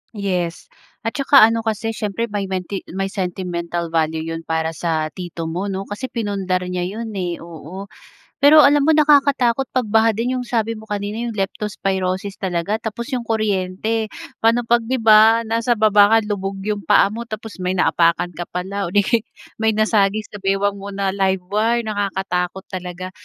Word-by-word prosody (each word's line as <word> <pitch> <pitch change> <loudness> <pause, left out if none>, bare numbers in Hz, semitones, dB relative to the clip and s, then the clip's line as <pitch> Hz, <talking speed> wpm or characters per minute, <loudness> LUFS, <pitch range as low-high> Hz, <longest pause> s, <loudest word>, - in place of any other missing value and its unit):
Yes. 180 -4 -3 0.3
At 225 - -1
saka 275 -3 +6
ano 225 +1 +4
kasi 225 0 -2
siyempre 215 +1 -3
may 200 -2 -2
menti 190 +1 -3
may 195 0 -2
sentimental 175 -3 -3
value 160 -1 0
'yon 165 0 -6
para 160 0 -1
sa 160 -1 -2
tito 175 -2 -6
mo 180 +5 -3
'no, 195 0 -3
kasi 220 +6 -5
pinundar 195 -6 -2
niya 180 0 -3
'yon 220 +3 -5
eh, 180 -3 -2
oo. 170 +4 -9 0.5
Pero 295 +2 +7
alam 285 0 +5
mo, 320 - +5
nakakatakot 275 -4 +3
'pag 250 -4 0
baha 225 +1 +4
din 245 +4 -1
yung 250 - -5
sabi 230 -1 -1
mo 220 - -12
kanina 205 +1 -4
yung 230 - -4
Leptospirosis 195 -1 -2
talaga 185 +1 -1
tapos 230 +3 -5
yung 245 -2 -2
kuryente. 215 0 -1 0.3
Paano 230 +2 +3
'pag 235 -1 +3
'di 255 +2 -1
ba, 220 +1 +6
nasa 230 +2 +1
baba 210 -2 +5
ka, - - +7
lubog 195 -1 -3
yung 205 -2 -3
paa - - +5
mo 230 +2 -5
tapos 220 -1 -7
may 180 0 -1
naapakan 170 -1 +2
ka 175 - -4
pala 195 +3 -3
o 175 - -6
'di 205 - +5
kaya'y 230 +2 +1 0.3
may 220 0 +2
nasagi 215 -1 +2
sa 205 - -10
bewang 195 +1 0
mo 200 +1 -7
na 195 -1 -1
live 190 -1 0
wire, 225 +3 +1
nakakatakot 190 -3 -2
talaga. 185 0 -6
200 Hz, 180 wpm, -20 LUFS, 185-225 Hz, 0.5 s, Pero